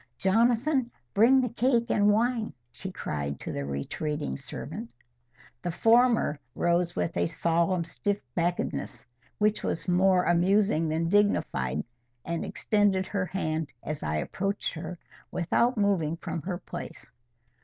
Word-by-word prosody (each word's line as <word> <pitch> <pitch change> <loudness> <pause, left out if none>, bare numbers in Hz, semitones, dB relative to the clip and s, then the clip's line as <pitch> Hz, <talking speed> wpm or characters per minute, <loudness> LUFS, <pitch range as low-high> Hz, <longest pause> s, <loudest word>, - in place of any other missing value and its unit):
"Jonathan, 240 +6 +2 0.2
bring 250 +6 +6
the 250 - 0
cake 235 0 +1
and 205 0 +4
wine," 230 +1 +1 0.2
she 180 +11 -6
cried 70 - -4
to - - -5
the 70 - -3
retreating 70 - -3
servant. 115 - -7 0.7
The 175 - -2
former 225 - +3 0.2
rose 175 0 +1
with 165 - -1
a - - +2
solemn 170 +2 +1
stiff 205 +4 -2 0.2
backedness, 175 -5 -2 0.3
which 210 0 +2
was - - -2
more 180 0 +4
amusing 175 -1 +3
than 160 +2 0
dignified, 75 - +1 0.4
and 170 0 -2
extended 205 -3 +1
her 190 -2 -2
hand 155 -5 -2
as 155 -1 -4
I 75 +1 -1
approached 195 - -2
her, 175 +2 -6 0.3
without 235 +8 +1
moving 180 -6 +1
from 165 - -4
her 180 +3 -3
place. - - -9
180 Hz, 135 wpm, -28 LUFS, 160-210 Hz, 0.7 s, bring